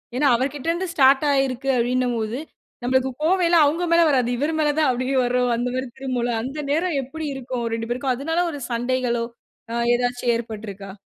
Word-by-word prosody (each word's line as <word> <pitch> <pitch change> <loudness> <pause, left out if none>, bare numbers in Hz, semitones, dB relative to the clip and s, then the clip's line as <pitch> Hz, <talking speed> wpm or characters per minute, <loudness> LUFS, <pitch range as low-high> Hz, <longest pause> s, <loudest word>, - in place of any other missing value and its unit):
ஏன்னா 285 +3 +2
அவர்க்கிட்டருந்து 295 +8 -1
ஸ்டார்ட் 270 +1 +5
ஆயிருக்கு 270 -1 0
அப்பிடின்னம்போது, 245 -1 0 0.4
நம்மளுக்கு 260 +1 +2
கோவமெல்லாம் 345 -2 +4
அவுங்க 330 +5 +1
மேல 335 - +6
வராது. 255 -4 +2
இவரு 295 +5 0
மேல 300 -1 +3
தான் 305 - +3
அப்பிடியே 255 +2 0
வர்ற 250 +1 +1 0.2
அந்தமாரி 250 +2 -2
திரும்பும்ல. 250 -3 -1
அந்த 275 +4 -5
நேரம் 320 0 +1
எப்பிடி 315 +5 -6
இருக்கும். 255 -1 -4
அவரு 230 -1 -1
2 225 0 -5
பேருக்கும்! 255 +1 0
அதுனால 325 +7 0
ஒரு 290 -3 -7
சண்டைகளோ! 240 0 0 0.5
அ - - -4 0.2
ஏதாச்சும் 245 0 0
ஏற்பட்ருக்கா? 210 -4 -6
255 Hz, 165 wpm, -23 LUFS, 245-290 Hz, 0.5 s, மேல